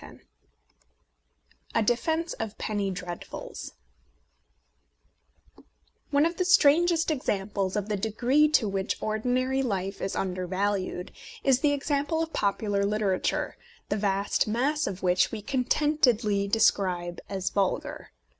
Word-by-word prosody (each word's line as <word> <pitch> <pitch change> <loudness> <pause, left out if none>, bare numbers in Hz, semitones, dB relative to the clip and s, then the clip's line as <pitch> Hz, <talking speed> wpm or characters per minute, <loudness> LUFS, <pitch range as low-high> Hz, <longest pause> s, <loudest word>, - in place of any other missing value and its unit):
A 230 - +3
DEFENCE 320 +9 0
OF 220 -1 -4
PENNY 205 -2 -2
DREADFULS 180 -2 -7 2.4
ONE 285 +1 +3
of 335 +1 -1
the 365 - +2
strangest 340 -1 +4
examples 200 -8 -1
of 205 -1 -1
the 210 -1 -1
degree 245 +9 +2
to 295 -8 +3
which 195 0 -2
ordinary 250 +5 0
life 195 -5 -2
is 195 - -2
un 190 -1 -1
dervalued 185 0 -2 0.3
is 265 -2 +4
the 290 0 +2
example 290 +3 0
of 325 - -7
popular 200 0 0
litera 200 -2 +1
ture, - - -2 0.3
the 205 - +1
vast 200 0 0
mass 275 +8 0
of 190 -1 -5
which 180 0 +3
we 225 - -4
contentedly 250 -4 +1
describe 180 -5 +1
as 190 -1 -2
vulgar. 195 -2 -1
215 Hz, 120 wpm, -27 LUFS, 195-280 Hz, 2.4 s, strangest